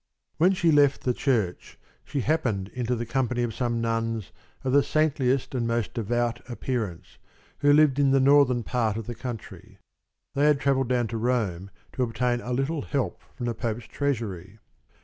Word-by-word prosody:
When 180 +4 +4
she 170 -3 +2
left 145 -2 +4
the 125 - +1
church, 115 -10 -1 0.3
she 140 - -3
happened 115 -9 0
into 125 +1 -2
the 120 0 -3
company 120 0 0
of 115 -2 -2
some 120 -1 -1
nuns 115 -2 -2 0.3
of 130 - -1
the 145 - +6
saintliest 135 -4 +1
and 120 -3 -1
most 115 -2 -1
devout 120 +1 -1
appearance, 115 -7 -4 0.4
who 145 0 +4
lived 145 -2 +5
in 140 -1 +4
the 135 0 +4
northern 135 -3 +4
part 115 -4 0
of 115 - -5
the 120 - -5
country. 120 -2 -8 0.6
They 140 +2 +2
had 150 -2 +4
travelled 135 -3 +1
down 125 -2 +2
to 115 - -3
Rome 110 -6 -1 0.2
to 130 - -3
obtain 120 +1 0
a 125 - -6
little 135 +5 -1
help 130 -12 -2
from 120 - -5
the 120 - -1
Pope's 115 0 -3
treasury. 110 -10 -3
125 Hz, 175 wpm, -26 LUFS, 115-135 Hz, 0.6 s, the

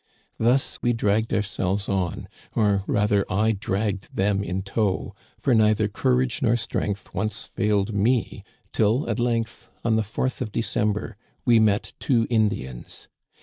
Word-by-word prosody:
" - - -44
Thus 130 +2 0
we 120 - +2
dragged 110 0 +1
ourselves 100 -1 -1
on, 95 -3 -2 0.3
or 100 -3 +2
rather 105 -1 +2
I 110 +4 +2
dragged 100 -1 -2
them 100 0 +1
in 95 0 -3
tow, 100 -1 -1 0.2
for 135 - +1
neither 110 -1 +4
courage 125 +3 0
nor 120 -1 +3
strength 105 -3 -3
once 110 0 -2
failed 105 0 0
me 110 +3 +1 0.3
till 110 +6 +2
at 115 -1 -1
length, 115 -1 -1 0.2
on 110 -1 +3
the - - +2
4th 110 +6 -3
of 115 -4 -3
December, 105 -1 -1 0.3
we 120 -2 +5
met 105 -2 +2
two 120 -5 +2
Indians. 100 - -2
105 Hz, 150 wpm, -24 LUFS, 100-115 Hz, 0.3 s, we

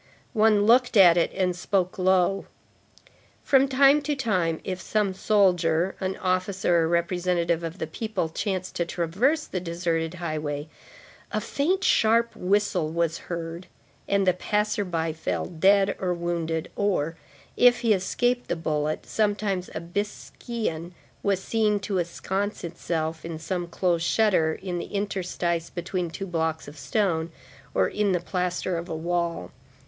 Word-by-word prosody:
One 215 -2 +4
looked 245 +1 +4
at 175 -4 +8
it 170 - +2
and 185 -2 0
spoke 185 0 -1
low. 185 +1 +2 1.0
From 270 0 +4
time 275 +2 +5
to 295 +1 -1
time, 185 - 0
if 185 -1 -4
some 210 -2 0
soldier, 185 -4 +2
an 190 0 -2
officer 185 -1 +1
or 160 - +2
representative 170 0 0
of 165 +2 -5
the - - -3
people, 195 +2 -3
chanced 185 +2 -3
to 170 - +1
traverse 210 - 0
the 185 - -3
deserted 170 -1 -2
highway, 155 -4 -3 0.6
a - - 0
faint, 365 +7 0
sharp 230 -3 +3
whistle 185 -4 +1
was 165 0 -1
heard, 170 +1 -5 0.4
and 200 -1 +2
the 185 - +4
passer 210 +3 0
by 165 -3 -2
fell 160 - -2
dead 195 +3 +3
or 180 -2 0
wounded, 170 -2 -2
or, 175 -6 0 0.4
if 245 0 +5
he 230 -2 +4
escaped 245 +6 0
the - - -1
bullet, 155 -1 -2
sometimes 205 -3 -1
a - - -1
biscaïen 190 -1 -4 0.3
was 195 -2 0
seen 215 -2 +1
to 195 -1 -1
ensconce 190 +4 -3
itself 165 -1 -3
in 165 -1 -5
some 175 +2 -3
closed 170 -1 0
shutter, 185 -8 +3
in 180 -2 -3
the - - -4
interstice 180 -4 -2
between 175 0 -3
two 195 +4 -5
blocks 160 -3 -2
of 145 - -10
stone, 165 -1 -1 0.4
or - - +3
in 210 -2 0
the 180 - +1
plaster 180 0 -2
of 170 - -8
a 160 - -3
wall. 170 - -2
180 Hz, 150 wpm, -26 LUFS, 170-205 Hz, 1.0 s, at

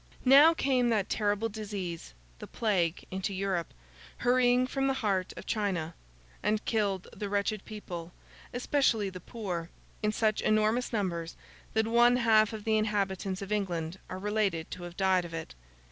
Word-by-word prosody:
Now 285 +6 +8
came 255 -5 +2
that 210 -4 +1
terrible 210 +1 +1
disease, 200 - -6 0.2
the - - -8
Plague, 185 -7 0
into 190 +1 -3
Europe, 185 -3 -1 0.5
hurrying 245 0 +3
from 270 +1 -1
the 270 - +1
heart 190 -3 +1
of - - -8
China; 185 -7 -1 0.5
and 215 0 0
killed 200 -4 0
the 205 - -4
wretched 205 +1 -1
people—especially 210 - -2
the 180 - -8
poor—in 185 0 -5
such 215 0 +1
enormous 215 +3 +2
numbers, 175 -7 -2 0.4
that 220 0 +3
one 240 +2 +5
half 220 -3 +4
of 220 -2 -6
the 220 0 +2
inhabitants 195 -2 -1
of 195 - -8
England 180 -4 -2
are 185 - -5
related 200 -5 -1
to 180 - -6
have 175 0 -10
died 190 -2 +3
of 170 -1 -7
it. 160 -1 -6
205 Hz, 150 wpm, -30 LUFS, 185-225 Hz, 0.5 s, Now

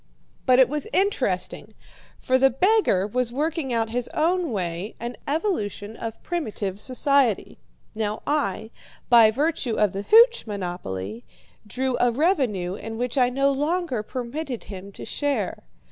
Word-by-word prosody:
"But 255 -1 +6
it 260 -1 +7
was 300 - -3
interesting, 400 +2 -1 0.4
for 260 -1 +1
the 270 +1 +6
beggar 360 - +3
was 245 +3 -1
working 300 +1 -2
out 225 -1 0
in - - -9
his 245 0 -1
own 340 0 +1
way 180 0 -3
an 240 +1 -5
evolution 250 - -2
of 225 -1 -7
primitive 210 - -3
society. 260 -3 +1 0.3
Now 215 -1 -3
I, 225 -7 -1 0.4
by 230 -3 +8
virtue 270 -1 -1
of 210 -3 +2
the 195 - -3
hooch 465 - +5
monopoly, 120 - -5 0.4
drew 255 +3 -1
a 245 - +4
revenue 240 - +1
in 225 +3 -6
which 245 +2 -2
I 250 -2 +4
no 275 +2 +2
longer 295 -2 -1
permitted 255 +3 -5
him 195 0 -9
to - - -9
share. 275 -10 -2
245 Hz, 145 wpm, -24 LUFS, 210-290 Hz, 0.4 s, by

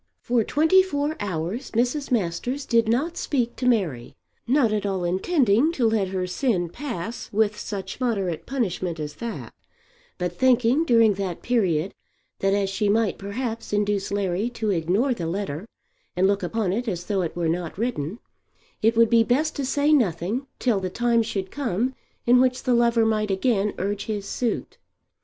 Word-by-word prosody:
For 240 -2 +2
twenty 320 - +4
four 300 -4 -1
hours 190 - -3
Mrs. 250 +5 0
Masters 245 +6 -1
did 230 -2 +2
not 280 +10 0
speak 245 -5 -1
to 250 - -1
Mary, 170 - 0 0.3
not 245 -4 +3
at 210 - 0
all 195 -3 -1
intending 230 - +2
to 245 -7 +2
let 220 -3 +1
her 185 -1 -2
sin 180 -2 0
pass 235 - -6
with 215 0 +2
such 195 +2 -6
moderate 195 -9 -1
punishment 185 -10 -2
as 150 -1 -5
that, 235 -1 -6 0.6
but 180 -1 -2
thinking 255 - +3
during 230 -6 +5
that 190 -3 -4
period 190 -8 +1 0.5
that 195 - +1
as 200 -1 +1
she 200 +2 0
might 220 0 +1
perhaps 225 +3 -4
induce 205 -1 0
Larry 200 +2 0
to 225 -3 -2
ignore 190 +10 +1
the 170 -8 -4
letter 185 0 -4 0.5
and 180 +1 +2
look 200 +1 +2
upon 190 +1 -1
it 240 +4 -2
as 175 -4 -3
though 200 -1 0
it 170 - -3
were 170 -1 -1
not 170 +1 -2
written, 210 - -2 0.6
it 225 +1 +3
would 230 -1 +5
be 230 -1 +6
best 285 +7 +1
to 280 - -1
say 290 +3 +2
nothing 220 - +1
till 235 -6 +1
the 185 -1 -3
time 235 +3 +2
should 200 -4 -3
come 255 -2 -1 0.3
in 245 +1 +6
which 255 0 +1
the 250 - +2
lover 235 -1 +3
might 215 -1 +1
again 205 +1 +1
urge 200 +1 -2
his 210 -3 -3
suit. 240 -3 -3
215 Hz, 175 wpm, -24 LUFS, 190-245 Hz, 0.6 s, be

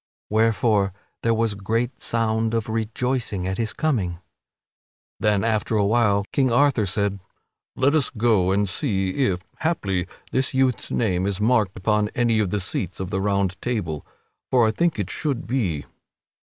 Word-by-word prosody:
Wherefore, 110 -3 +2 0.3
there 115 0 +2
was 115 -1 +1
great 115 +6 -2
sound 115 0 0
of 115 -2 -1
rejoicing 110 -2 -1
at 95 +3 -2
his 115 -1 -1
coming. 105 - -1 1.0
Then, 105 -2 +2
after 110 0 0
a 105 -2 +3
while, 100 -2 +2
King 130 -3 +2
Arthur 125 -4 +3
said: 100 +1 -1 0.6
"Let 135 +3 +3
us 155 -4 +2
go 110 -5 +2
and 100 +1 +2
see 95 -1 -1 0.2
if, 90 -2 -1 0.2
haply, 100 - -1 0.2
this 130 0 0
youth's 130 -2 +1
name 95 -5 0
is 100 -1 -2
marked 110 -3 +2
upon 105 +1 +1
any 120 -2 +2
of 105 -3 +1
the 105 - -1
seats 95 -1 -3
of 95 -1 -4
the 95 - 0
Round 100 -1 0
Table, 95 -12 -2 0.5
for 125 -3 +4
I 110 - +3
think 170 +5 +1
it 100 -4 -3
should 145 -6 -2
be 105 - -1
there." - - -19
110 Hz, 165 wpm, -23 LUFS, 100-120 Hz, 1.0 s, for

